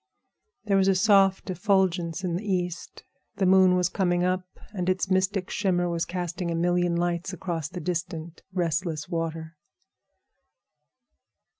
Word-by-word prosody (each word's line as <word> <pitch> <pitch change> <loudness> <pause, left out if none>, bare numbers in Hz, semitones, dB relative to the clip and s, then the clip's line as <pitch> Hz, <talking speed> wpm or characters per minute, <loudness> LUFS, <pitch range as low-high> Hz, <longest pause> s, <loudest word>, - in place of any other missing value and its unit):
There 200 -2 +2
was 190 0 +3
a 195 - +4
soft 195 -1 +3
effulgence 180 -2 +1
in 175 -2 -1
the 185 - -3
east. 180 -4 -3 0.3
The 195 - 0
moon 185 0 +5
was 180 -1 +2
coming 175 -1 0
up, 185 0 -2
and 180 -2 -2
its 185 +1 0
mystic 190 0 0
shimmer 180 -3 +1
was 170 -1 -1
casting 175 0 -4
a 170 - -1
million 175 0 +1
lights 175 +2 -1
across 170 -4 -3
the 180 - -7
distant, 170 -1 -4
restless 165 -3 -1
water. 165 -2 -4
180 Hz, 140 wpm, -26 LUFS, 170-190 Hz, 0.3 s, moon